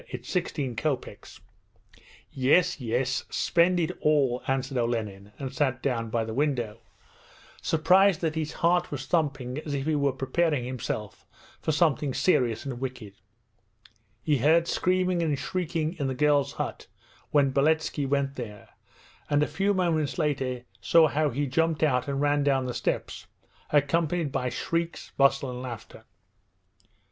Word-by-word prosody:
It's 125 0 -7
sixteen 145 -8 -2
kopeks.' 140 +2 -4 0.9
'Yes, 155 +7 +3
yes, 125 +1 -1
spend 175 +1 +2
it 165 - 0
all,' 140 -5 +2
answered 135 0 -1
Olenin 105 -4 -3
and 135 -2 -5
sat 130 -3 0
down 115 -4 -1
by 115 0 -1
the 110 - -5
window, 120 -5 -1 0.8
surprised 180 +3 +4
that 160 -2 0
his 155 -1 -3
heart 175 +1 +2
was 135 -2 -5
thumping 140 -4 -1
as 150 -2 -4
if 135 0 -3
he 155 - +1
were 140 -2 +2
preparing 135 +1 0
himself 115 -5 -5 0.4
for - - 0
something 150 -4 +1
serious 120 -11 +1
and 130 -3 -5
wicked. 125 -6 -6 1.1
He 145 -3 +2
heard 160 +6 +4
screaming 180 -1 +1
and 155 -4 0
shrieking 165 -1 -2
in 140 - 0
the 130 - -2
girls' 145 0 +2
hut - - -5 0.4
when 140 -2 +3
Beletski 150 0 +1
went 140 0 0
there, 105 -5 -8 0.6
and 145 0 +3
a - - 0
few 195 +7 0
moments 170 -6 0
later 130 -6 -1 0.2
saw 160 -2 +5
how 150 +1 +1
he 140 +4 -1
jumped 160 +3 0
out 125 -4 +2
and 140 -1 -2
ran 145 0 +2
down 135 -2 +2
the 125 - -3
steps, - - -3 0.4
accompanied 155 +2 +1
by 125 -1 -1
shrieks, 170 +5 -3
bustle, 135 -1 +3
and 125 0 -6
laughter. 115 -4 -8
140 Hz, 150 wpm, -27 LUFS, 125-160 Hz, 1.1 s, saw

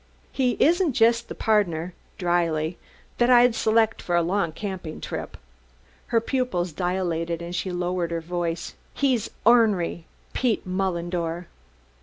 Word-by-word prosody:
"He 255 -3 0
isn't 340 -1 +3
just 230 +1 +3
the - - -6
pardner," 180 -6 +1 0.2
dryly, 170 -2 0 0.4
"that 240 0 +4
I'd 245 -1 +6
select 225 0 +2
for 175 - -1
a 170 - +3
long 175 -1 0
camping 185 -3 -6
trip." - - -6 0.7
Her 230 - +3
pupils 225 -8 -1
dilated 170 -2 -1
and 170 +1 -6
she 180 +2 -2
lowered 175 -1 -1
her 170 0 -2
voice: 170 0 -3 0.2
"He's 260 -6 +1 0.2
ornery 210 -8 +3 0.3
Pete 240 -5 0
Mullendore." 175 -2 -2
180 Hz, 130 wpm, -25 LUFS, 170-225 Hz, 0.7 s, I'd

